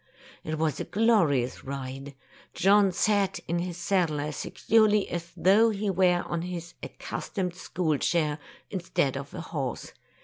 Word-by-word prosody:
It 155 0 -3
was 155 -3 0
a - - -1
glorious 170 - +2
ride. 135 +1 -6 0.4
John 200 +1 +5
sat 200 +1 +1
in 170 +1 0
his 175 -1 -4
saddle 170 -4 +1
as 150 +1 -3
securely 215 -2 +2
as 170 0 -5
though 210 +5 +5
he 205 -1 -1
were 180 -1 +3
on 170 - -2
his 175 0 -6
accustomed 185 -3 -4
school 175 -3 -1
chair, 155 -3 +1 0.3
instead 170 -7 -1
of 140 +1 -6
a - - -5
horse. 140 -8 -5
175 Hz, 145 wpm, -27 LUFS, 150-195 Hz, 0.4 s, John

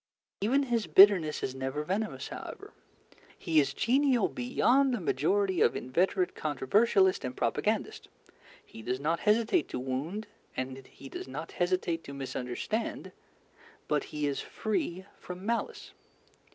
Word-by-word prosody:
Even 260 +8 +3
his 235 -5 -1
bitterness 190 -6 +6
is 130 - -2
never 135 +3 -3
venomous, 205 +6 -3
however. - - -8 0.6
He 160 -3 +2
is 140 -2 +2
genial 255 - +2
beyond 260 +1 +2
the - - -3
majority 185 +4 +1
of - - +4
inveterate 180 +7 0
controversialists 190 - +2
and 130 0 -5
propagandists. - - -1 0.6
He 115 - -12
does 125 +3 -2
not 160 +4 0
hesitate 225 - +2
to - - -4
wound 140 +12 -3 0.3
and 130 0 -5
he 135 - -13
does - - -7
not 145 +5 -6
hesitate 175 -2 0
to 140 - -8
misunderstand, 135 - -4 0.8
but 150 -1 0
he 150 -1 -3
is 140 -1 -1
free 190 -4 -3
from 180 +2 -8
malice. 235 +1 -2
175 Hz, 135 wpm, -30 LUFS, 140-215 Hz, 0.8 s, bitterness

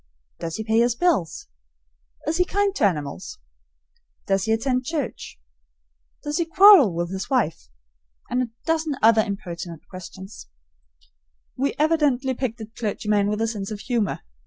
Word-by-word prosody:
Does 165 -1 -4
he 220 - -4
pay 220 +1 +2
his 235 0 +2
bills? 240 - 0 0.8
Is 310 +3 0
he 360 - +4
kind 400 +2 0
to - - +2
animals? 175 - -2 0.9
Does 195 -1 +1
he 220 - 0
attend 250 +3 +1
church? 290 - -5 0.8
Does 295 +2 -2
he 340 - +1
quarrel 365 - +7
with 175 +1 -2
his 190 0 -5
wife? 205 - 0 0.6
And 250 - 0
a 250 - -2 0.2
dozen 320 -2 0
other 225 0 +6
impertinent 175 -5 -6
questions. 190 - -10 1.1
We 275 +1 -1
evidently 290 -4 +2
picked 245 -2 -3
a - - -5
clergyman 210 -2 -1
with 210 +1 -2
a 225 - +1
sense 205 -3 -4
of 210 -2 -6
humor. 230 -4 -1
225 Hz, 150 wpm, -23 LUFS, 195-290 Hz, 1.1 s, quarrel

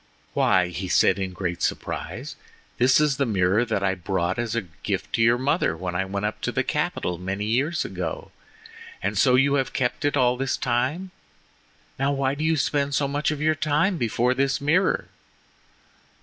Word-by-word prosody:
"Why," 90 -1 +3
he 90 +2 -5
said 95 - +3
in 95 -1 -2
great 90 -1 -4
surprise, - - -3 0.4
"this 130 +3 +5
is 150 -2 +2
the 140 - +1
mirror 100 +1 +2
that 110 -5 -2
I 95 -1 +2
brought 90 +1 -2
as 115 -2 -2
a 115 - 0
gift 85 -3 -5
to - - +1
your 115 +1 +4
mother 130 - 0
when 90 +1 -4
I 95 +2 -1
went 100 +1 -3
up 105 - -3
to - - -1
the - - 0
capital 90 -1 -2
many 95 +3 -3
years 135 +10 0
ago! - - -5 0.7
And - - -1
so 125 -2 +4
you 140 +2 +3
have 130 - -7
kept 125 -2 -1
it 145 0 +1
all 125 -1 +3
this 135 0 -1
time? 130 +10 -1 0.9
Now, 135 +1 +1
why 135 -1 0
do 145 +2 -4
you 160 0 +2
spend 140 0 0
so 140 - +1
much 145 +2 -1
of 150 -1 -3
your 155 0 +3
time 155 +5 +1
before 120 +2 +1
this 135 +1 0
mirror?" 160 +7 +1
125 Hz, 190 wpm, -24 LUFS, 95-140 Hz, 0.9 s, this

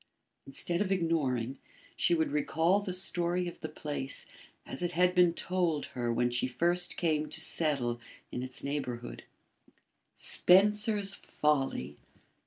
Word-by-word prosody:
Instead 170 +6 -2
of 200 -2 -1
ignoring, 140 -9 0 0.4
she 170 - +2
would 160 -3 0
recall 160 +6 +1
the 200 -2 -5
story 180 -1 -1
of 175 - -8
the - - -6
place 140 -3 -3 0.4
as 135 - -4
it 175 0 -2
had 180 +1 +3
been 180 -1 +5
told 170 -3 -1
her 120 -2 -2
when 120 +1 +1
she 125 +1 +1
first 175 +7 +1
came 155 -3 0
to - - -3
settle 130 -7 +1 0.3
in 125 - -4
its 130 0 -4
neighbourhood. 125 -4 -5 0.9
Spencer's 205 +2 +4
Folly! 135 - -1
160 Hz, 135 wpm, -30 LUFS, 135-180 Hz, 0.9 s, been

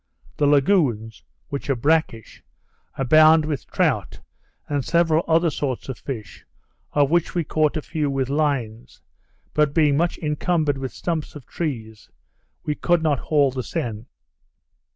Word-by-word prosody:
The 145 - +2
lagoons 135 - +2 0.3
(which 140 0 -5
are 135 - +2
brackish) 140 -4 -1 0.6
abound 155 +4 +5
with 145 -5 -4
trout, - - -1 0.5
and 145 -2 -1
several 170 0 +2
other 165 0 +3
sorts 135 -3 -4
of 130 - -5
fish, 115 -7 -7 0.5
of 145 -1 +2
which 170 0 +1
we 170 - +1
caught 155 0 0
a 155 - -4
few 155 -4 -2
with 135 -2 -1
lines, 135 -6 -2 0.5
but 150 -2 +1
being 150 -4 +3
much 170 +2 0
encumbered 150 -2 0
with 130 -1 -4
stumps 165 -4 -4
of 145 -5 -10
trees, 115 -11 -5 0.5
we 150 - -1
could 175 +2 +1
not 145 -4 +1
haul 145 -3 +2
the 130 0 -4
seine. 115 -2 -5
145 Hz, 145 wpm, -22 LUFS, 130-160 Hz, 0.6 s, abound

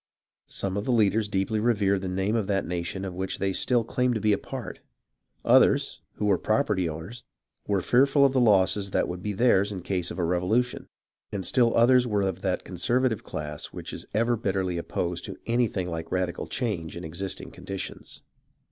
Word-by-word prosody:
Some 95 0 -3
of 100 - -2
the - - 0
leaders 110 -2 +3
deeply 105 +2 0
revered 100 -4 +2
the 95 - -4
name 95 +4 0
of 110 -4 0
the 100 -2 +1
nation 90 +2 -3
of 95 - -5
which 95 +1 -3
they 95 -1 -1
still 120 +4 +2
claimed 125 +1 0
to - - 0
be 105 0 +3
a - - +2
part; - - -7 0.7
others, - - +4
who 105 - -3
were 100 -3 +3
property 105 -5 +1
owners, 85 +10 -8 0.4
were 100 -2 +1
fearful 135 - +4
of 135 - +3
the 130 - +3
losses 100 -2 +3
that - - +1
would 90 0 -5
be 105 +2 -3
theirs 100 -2 +3
in 95 -4 -6
case 90 -2 -1
of - - -7
a 90 - 0
revolution; 90 +9 0 0.4
and 95 -3 -3
still 120 +4 +3
others 125 +1 +5
were 105 -3 +1
of 95 -1 -2
that 95 -2 -1
conservative 115 +5 0
class 75 -1 -5
which - - -8
is - - -8
ever 115 +3 +2
bitterly 95 -5 -1
opposed 85 +1 -3
to - - -7
anything 115 -6 0
like 80 -1 -4
a 85 - -2
radical 90 -1 -2
change 90 -10 -3
in 85 - -7
existing 95 +4 -5
conditions. 95 -1 -8
100 Hz, 195 wpm, -26 LUFS, 90-115 Hz, 0.7 s, others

